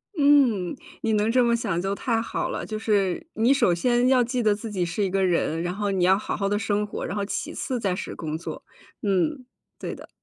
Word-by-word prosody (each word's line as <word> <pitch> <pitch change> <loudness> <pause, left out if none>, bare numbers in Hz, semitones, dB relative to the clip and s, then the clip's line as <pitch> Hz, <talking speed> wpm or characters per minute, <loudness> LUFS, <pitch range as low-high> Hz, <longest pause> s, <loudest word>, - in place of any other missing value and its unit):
嗯， 275 - +4 0.3
你 220 - 0
能 210 +1 +2
这 250 +1 +4
么 235 -1 +3
想 210 -7 -1
就 195 +2 -1
太 225 +2 0
好 225 - -3
了。 - - -4
就 215 -1 -4
是， 200 - 0
你 235 +5 +3
首 190 -10 +3
先 240 +6 +2
要 255 -1 +5
记 245 +1 -1
得 215 -2 +3
自 215 +1 -7
己 185 -4 0
是 175 +5 -2
一 195 - +1
个 195 0 +1
人， 170 -2 +1
然 175 +1 -2
后 205 0 -1
你 190 -2 +1
要 190 +1 +5
好 210 - -3
好 200 - 0
地 205 - +1
生 210 -1 0
活， - - -5
然 180 - -4
后 205 - -1
其 - - -4
次 255 -2 -3
再 195 -5 0
是 - - -6
工 155 -1 -4
作。 170 - -7 0.4
嗯。 225 - 0 0.3
对 - - -4
的。 - - -11
210 Hz, 260 characters per minute, -25 LUFS, 190-235 Hz, 0.4 s, 要